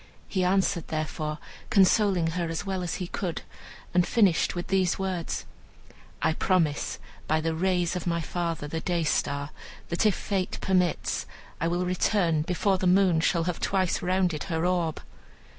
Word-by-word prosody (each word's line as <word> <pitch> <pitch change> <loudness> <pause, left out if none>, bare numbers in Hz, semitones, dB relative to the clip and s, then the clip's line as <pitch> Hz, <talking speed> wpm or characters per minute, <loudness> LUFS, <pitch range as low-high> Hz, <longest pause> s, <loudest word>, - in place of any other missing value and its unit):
He 185 -2 0
answered, 185 -2 +1
therefore, 155 -1 -3 0.3
consoling 195 -5 +4
her 170 -1 -2
as 165 +3 -3
well 190 -2 -2
as 175 -2 -2
he 185 - -3
could, 175 -1 -4 0.5
and 180 0 +5
finished 200 -9 +3
with 175 - -3
these 190 -2 +2
words: 185 -3 -3 0.8
"I 160 +1 +3
promise, 165 -4 +1 0.3
by 155 +1 +2
the 160 +1 -1
rays 180 +1 +1
of 180 -1 -4
my 170 0 +1
father 165 -2 -3
the 160 +2 -3
Day 175 -1 0
star, 145 -1 -1 0.4
that 175 +6 +2
if 210 - +2
fate 195 -2 -2
permits 180 -3 0 0.3
I 165 - 0
will 175 +2 0
return 180 -3 +1
before 185 +4 +1
the 185 - +1
moon 180 -2 +4
shall 165 +1 +2
have 175 0 -2
twice 190 -2 0
rounded 180 -4 0
her 165 -1 -1
orb." 175 -3 0
175 Hz, 160 wpm, -27 LUFS, 165-185 Hz, 0.8 s, and